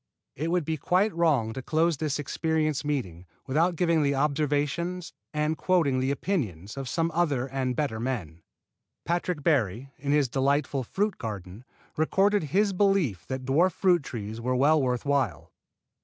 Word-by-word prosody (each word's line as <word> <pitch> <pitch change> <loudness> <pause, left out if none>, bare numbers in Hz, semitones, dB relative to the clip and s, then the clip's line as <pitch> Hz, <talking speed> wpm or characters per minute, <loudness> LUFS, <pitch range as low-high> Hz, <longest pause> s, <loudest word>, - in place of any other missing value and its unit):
It 155 +5 -2
would 175 -2 +1
be 160 0 -1
quite 185 +8 +2
wrong 145 -10 +2
to 130 - -5
close 160 +4 +1
this 150 -1 -1
experience 155 0 -1
meeting 95 - -3 0.2
without 165 +6 +1
giving 165 -2 +2
the 140 -1 +1
observations 150 +5 -1 0.2
and 150 +1 0
quoting 160 -8 +2
the 130 +1 0
opinions 115 - -2
of 135 -2 -5
some 165 +5 0
other 150 -7 +1
and 130 -2 -2
better 135 -7 -1
men. 105 - -4 0.6
Patrick 170 -2 -1
Barry, 135 - +1
in 140 +1 -2
his 145 -2 +3
delightful 135 +1 0
"Fruit 205 - -1
Garden," 105 0 -7 0.3
recorded 195 +4 +2
his 195 +7 +1
belief 185 - +1
that 130 -1 -4
dwarf 160 +7 +3
fruit 180 -2 +3
trees 110 -4 -6
were 125 +2 0
well 145 +4 +4
worth 125 -1 -1
while. 135 - 0
145 Hz, 155 wpm, -27 LUFS, 130-165 Hz, 0.6 s, well